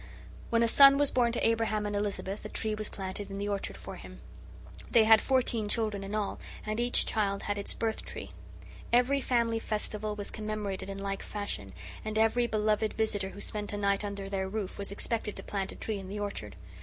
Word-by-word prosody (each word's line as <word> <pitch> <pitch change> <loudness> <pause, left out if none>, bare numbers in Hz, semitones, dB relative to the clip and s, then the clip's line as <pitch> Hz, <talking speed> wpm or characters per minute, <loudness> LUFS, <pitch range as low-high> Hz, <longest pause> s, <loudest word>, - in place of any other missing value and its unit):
When 230 0 +3
a - - +4
son 275 +3 +8
was 290 -1 +3
born 240 -2 +3
to 240 - +2
Abraham 225 -2 +1
and 205 0 -2
Elizabeth 205 -1 -2
a - - -6
tree 220 -1 -1
was 215 0 -2
planted 195 +1 -5
in 195 - -5
the 200 +1 -2
orchard 200 -1 -2
for - - -8
him. - - -11 0.7
They 230 - +6
had 220 0 +7
fourteen 240 -5 +1
children 210 -3 0
in 200 +2 -4
all, 210 -2 -2 0.3
and 215 +1 -2
each 240 +1 +4
child 200 -2 0
had 205 0 -1
its 200 - -3
"birth 225 -1 -1
tree." - - -7 0.6
Every 250 +4 +4
family 235 -3 +1
festival 210 -1 -2
was 205 -1 -6
commemorated 210 -3 -4
in 195 - -5
like 195 0 -3
fashion, 205 - -4 0.3
and 215 0 -3
every 225 +2 +3
beloved 215 -1 +1
visitor 205 -3 0
who 205 - -9
spent 210 0 -2
a - - -2
night 200 0 +1
under 200 -1 -4
their 190 -1 -2
roof 200 -2 -4
was 200 -1 -2
expected 210 +1 -1
to - - -7
plant 195 -2 -2
a - - -9
tree 215 -2 -3
in 190 -1 -8
the 205 +1 -4
orchard. 200 - -4
210 Hz, 210 wpm, -30 LUFS, 200-225 Hz, 0.7 s, son